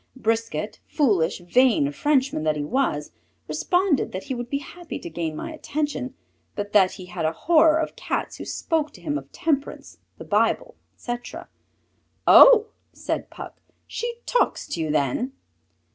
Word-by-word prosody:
Brisquet, 230 Hz, -2 st, -2 dB
foolish, 195 Hz, -, +1 dB
vain 200 Hz, -, +3 dB
Frenchman 270 Hz, -, +1 dB
that 155 Hz, -1 st, +1 dB
he 150 Hz, -, -2 dB
was, 150 Hz, -, -1 dB, 0.4 s
responded 295 Hz, -, +1 dB
that 185 Hz, -, -4 dB
he 270 Hz, -, -4 dB
would 240 Hz, -1 st, -5 dB
be 280 Hz, -, 0 dB
happy 340 Hz, +4 st, -8 dB
to 170 Hz, -, -8 dB
gain 160 Hz, -1 st, -3 dB
my 325 Hz, -, -5 dB
attention, 295 Hz, -4 st, -3 dB, 0.4 s
but 205 Hz, 0 st, -5 dB
that 190 Hz, -3 st, +5 dB
he 185 Hz, -, -9 dB
had 180 Hz, -2 st, -5 dB
a 160 Hz, -, +2 dB
horror 315 Hz, -, +4 dB
of 320 Hz, -, -2 dB
Cats -, -, -3 dB
who -, -, -7 dB
spoke 315 Hz, -2 st, -1 dB
to -, -, -14 dB
him 295 Hz, -2 st, -2 dB
of 300 Hz, -, -6 dB
temperance, 290 Hz, -3 st, -2 dB, 0.2 s
the -, -, -9 dB
Bible, -, -, +1 dB, 0.2 s
etc. 240 Hz, 0 st, -6 dB, 0.8 s
"Oh!" 455 Hz, -3 st, +8 dB, 0.2 s
said -, -, -4 dB
Puck, -, -, -10 dB, 0.2 s
"she 475 Hz, 0 st, -4 dB
talks -, -, +1 dB
to 170 Hz, -, -3 dB
you 155 Hz, -, -2 dB
then?" 150 Hz, -, 0 dB
255 Hz, 160 wpm, -24 LUFS, -, 0.8 s, Oh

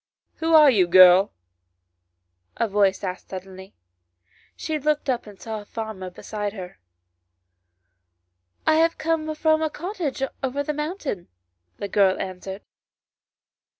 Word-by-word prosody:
" -, -, -54 dB
Who 325 Hz, 0 st, +3 dB
are 300 Hz, -3 st, +8 dB
you, 190 Hz, -7 st, +3 dB
girl? 185 Hz, +2 st, +7 dB, 0.6 s
" 90 Hz, 0 st, -38 dB
a 230 Hz, -, +1 dB
voice 200 Hz, -2 st, +1 dB
asked 185 Hz, -1 st, -5 dB
suddenly. 190 Hz, +1 st, -9 dB, 0.8 s
She 315 Hz, -1 st, -3 dB
looked 295 Hz, -1 st, 0 dB
up 240 Hz, -3 st, -3 dB
and 205 Hz, -2 st, -13 dB
saw 220 Hz, -2 st, -6 dB
a -, -, -15 dB
farmer 215 Hz, -4 st, -6 dB
behind 205 Hz, +3 st, -5 dB
her. 180 Hz, -, -9 dB, 1.0 s
" 90 Hz, 0 st, -50 dB
I 315 Hz, 0 st, +4 dB
have 330 Hz, +1 st, +2 dB
come 315 Hz, -1 st, -1 dB
from 315 Hz, 0 st, +2 dB
a 315 Hz, -, 0 dB
cottage 325 Hz, -5 st, -4 dB, 0.2 s
over 270 Hz, +2 st, -2 dB
the 300 Hz, -, -2 dB
mountain," 300 Hz, -, -4 dB, 0.5 s
the 200 Hz, -, -4 dB
girl 195 Hz, -2 st, +2 dB
answered. 190 Hz, +1 st, -6 dB
205 Hz, 140 wpm, -24 LUFS, 180-300 Hz, 1.0 s, are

